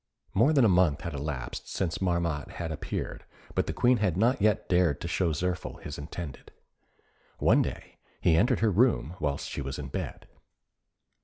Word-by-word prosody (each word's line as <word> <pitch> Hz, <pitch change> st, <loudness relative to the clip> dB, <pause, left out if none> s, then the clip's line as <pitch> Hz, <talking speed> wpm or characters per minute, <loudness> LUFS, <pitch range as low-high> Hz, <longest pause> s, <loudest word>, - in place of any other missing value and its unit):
More 115 Hz, +10 st, +4 dB
than 140 Hz, -6 st, +5 dB
a -, -, +7 dB
month 90 Hz, -6 st, +3 dB
had 85 Hz, -3 st, -5 dB
elapsed 70 Hz, -3 st, -5 dB
since 85 Hz, -2 st, -2 dB
Marmotte 85 Hz, -5 st, -1 dB
had 85 Hz, -2 st, -4 dB
appeared, 80 Hz, -, -4 dB, 0.3 s
but -, -, 0 dB
the -, -, 0 dB
Queen 125 Hz, 0 st, +4 dB
had 95 Hz, -6 st, 0 dB
not 115 Hz, +3 st, +3 dB
yet 105 Hz, 0 st, +2 dB
dared 90 Hz, -5 st, +3 dB
to -, -, -3 dB
show 90 Hz, -3 st, +1 dB
Zirphil 90 Hz, +4 st, -3 dB
his 75 Hz, -, -6 dB
intended. 75 Hz, 0 st, -7 dB, 0.9 s
One -, -, +4 dB
day -, -, -5 dB, 0.2 s
he 80 Hz, -, +4 dB
entered 105 Hz, +9 st, +3 dB
her 110 Hz, -2 st, +3 dB
room 100 Hz, -, +2 dB
whilst 70 Hz, -2 st, -2 dB
she -, -, -4 dB
was 70 Hz, +2 st, -4 dB
in 70 Hz, -3 st, -6 dB
bed. -, -, -5 dB
85 Hz, 175 wpm, -28 LUFS, 75-100 Hz, 0.9 s, a